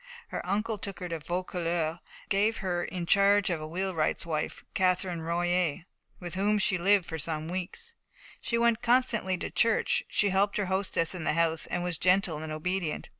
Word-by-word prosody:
Her - - -4
uncle 210 +3 -1
took 200 -1 -3
her 180 - -5
to 165 -1 -3
Vaucouleurs, 170 -1 -2
and - - -22
gave 210 +3 +2
her 175 -3 -2
in 180 -2 -4
charge 200 +1 +4
of 165 -3 -2
a 155 - -5
wheelwright's 175 -2 -1
wife, 155 -2 -3
Catherine 180 -2 +1
Royer, 175 0 0 0.3
with 175 -2 -6
whom 205 +3 +2
she 190 -2 +1
lived 195 0 +4
for 160 - -5
some 155 0 -2
weeks. 185 - -6 0.5
She 235 - -1
went 235 -1 +2
constantly 235 -6 +2
to - - -5
church, 230 -1 +2
she 205 - +2
helped 195 +2 +2
her 205 - 0
hostess 190 -3 0
in 180 -3 -5
the - - +1
house, 165 0 +2
and 175 - -2
was 175 -2 -1
gentle 180 -4 +2
and 155 0 -6
obedient. 170 +1 -3
180 Hz, 185 wpm, -29 LUFS, 170-200 Hz, 0.5 s, charge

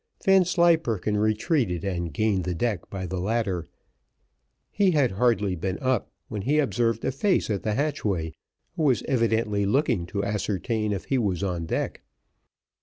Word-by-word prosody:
Vanslyperken 170 - +3
retreated 110 - +1
and 85 -4 -2
gained 100 +3 +1
the 90 0 -2
deck 100 -1 -2
by 95 -1 -5
the 90 0 -3
ladder; 95 -4 -1 1.0
he 200 -2 +3
had 145 -8 +2
hardly 105 -2 +1
been 95 +2 -3
up 130 -4 0 0.2
when 105 - -4
he 140 +9 +1
observed 115 -4 +1
a - - +1
face 160 - +1
at 100 - -1
the 110 -1 -1
hatchway, 100 - -1 0.4
who 170 - -3
was 130 -8 +2
evidently 110 -4 +1
looking 100 - +1
to 100 +2 -2
ascertain 105 +2 -1
if 100 -2 -3
he 135 - +1
was 100 -5 -1
on 85 -4 -2
deck. - - -2
105 Hz, 155 wpm, -26 LUFS, 95-130 Hz, 1.0 s, Vanslyperken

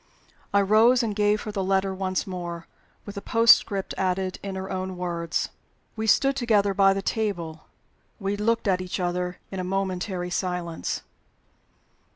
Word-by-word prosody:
I 200 - +4
rose 225 +5 +5
and 215 -3 -2
gave 210 0 +2
her 215 - -4
the 200 -2 -2
letter 190 0 +1
once 185 -1 -1
more 175 -3 -5 0.4
with 205 - -7
the 200 - -6
postscript 225 -4 +4
added, 185 0 -1
in 195 -1 -5
her 190 0 -5
own 185 0 -3
words. 170 -2 -2 0.5
We 220 0 -3
stood 275 +5 +4
together 210 -5 +2
by 195 0 +5
the 195 - -3
table; 175 -9 -2 0.5
we 195 0 -1
looked 225 +2 0
at 185 -2 +2
each 185 +1 -4
other 180 0 -2
in 190 - -4
a - - -2
momentary 185 -1 -2
silence. 175 -2 -2
190 Hz, 160 wpm, -25 LUFS, 180-205 Hz, 0.5 s, rose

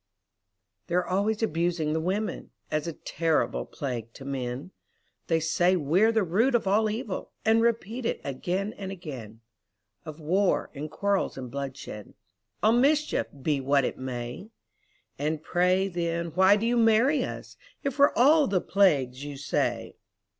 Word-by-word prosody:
They're 180 0 +1
always 205 +4 0
abusing 165 -4 0
the 160 - 0
women, 195 +6 -2 0.2
As 155 +1 -1
a 165 - -3
terrible 160 +1 -1
plague 120 -5 -5
to 135 - -11
men; 130 +3 -4 0.6
They 165 -1 +2
say 175 +3 +2
we're 180 +8 +3
the 220 -2 +2
root 220 +9 +2
of 235 - +1
all 215 +3 +3
evil, 220 -2 -4
And 225 +1 +4
repeat 230 +1 0
it - - -2
again 180 +10 -2
and 195 -1 -5
again 130 - -8 0.6
Of 155 0 -9
war, 185 +5 +1
and 150 +2 -6
quarrels, 200 +2 -1
and 125 -2 -7
bloodshed, 135 -6 -7 0.5
All 215 - +6
mischief, 290 +6 +2 0.2
be 145 -2 +1
what 140 0 +2
it - - -4
may. 125 - -5 0.7
And 155 +1 -2
pray, 180 +3 +2
then, 170 -2 -2
why 190 +4 +5
do 210 +2 -1
you 240 +1 +2
marry 235 +5 +4
us, - - -7 0.3
If 275 0 -3
we're 285 - +6
all 290 +4 +5
the 195 -2 +1
plagues 140 -11 +2
you 145 -1 -6
say? 145 +1 -2
175 Hz, 155 wpm, -27 LUFS, 145-215 Hz, 0.7 s, All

